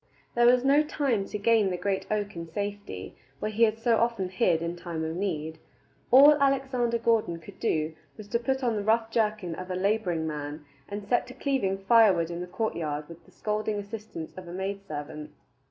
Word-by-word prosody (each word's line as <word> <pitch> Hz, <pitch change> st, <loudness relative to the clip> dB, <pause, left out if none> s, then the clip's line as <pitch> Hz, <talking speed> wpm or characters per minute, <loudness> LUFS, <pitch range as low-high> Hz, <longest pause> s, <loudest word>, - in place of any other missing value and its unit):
There 240 Hz, 0 st, +4 dB
was 250 Hz, +1 st, +5 dB
no 280 Hz, +2 st, +5 dB
time 275 Hz, -9 st, 0 dB
to 210 Hz, -, -4 dB
gain 215 Hz, -1 st, +3 dB
the 180 Hz, -, -2 dB
great 190 Hz, +1 st, -2 dB
oak 205 Hz, -2 st, -2 dB
in 170 Hz, 0 st, -6 dB
safety, 200 Hz, -, -5 dB, 0.2 s
where 215 Hz, -, -3 dB
he 215 Hz, +2 st, -4 dB
had 220 Hz, 0 st, -1 dB
so 230 Hz, 0 st, +2 dB
often 230 Hz, -6 st, 0 dB
hid 180 Hz, -4 st, +1 dB
in 170 Hz, +1 st, -3 dB
time 170 Hz, -2 st, -5 dB
of 160 Hz, +1 st, -3 dB
need. 160 Hz, -4 st, -3 dB, 0.5 s
All 280 Hz, +4 st, +9 dB
Alexander 265 Hz, -4 st, +2 dB
Gordon 225 Hz, -7 st, +1 dB
could 160 Hz, -, -13 dB
do 155 Hz, 0 st, 0 dB, 0.2 s
was 215 Hz, -, -10 dB
to 235 Hz, -, +1 dB
put 265 Hz, +2 st, -1 dB
on 235 Hz, -3 st, +1 dB
the 205 Hz, -, -2 dB
rough 225 Hz, +1 st, +2 dB
jerkin 215 Hz, -6 st, 0 dB
of 185 Hz, +2 st, -7 dB
a 185 Hz, -, -2 dB
laboring 185 Hz, -4 st, 0 dB
man, 150 Hz, -1 st, -5 dB, 0.2 s
and 205 Hz, 0 st, -5 dB
set 245 Hz, +2 st, +1 dB
to 255 Hz, -, -10 dB
cleaving 260 Hz, -9 st, 0 dB
firewood 195 Hz, -7 st, +5 dB
in 170 Hz, +1 st, -4 dB
the 180 Hz, -, -5 dB
courtyard 155 Hz, -8 st, -3 dB
with 170 Hz, 0 st, -12 dB
the 185 Hz, -, -20 dB
scolding 210 Hz, +2 st, -2 dB
assistance 205 Hz, -5 st, -7 dB
of 185 Hz, -1 st, -9 dB
a 170 Hz, -, -8 dB
maid 195 Hz, +2 st, -3 dB
servant. 150 Hz, 0 st, -6 dB
200 Hz, 200 wpm, -28 LUFS, 170-230 Hz, 0.5 s, All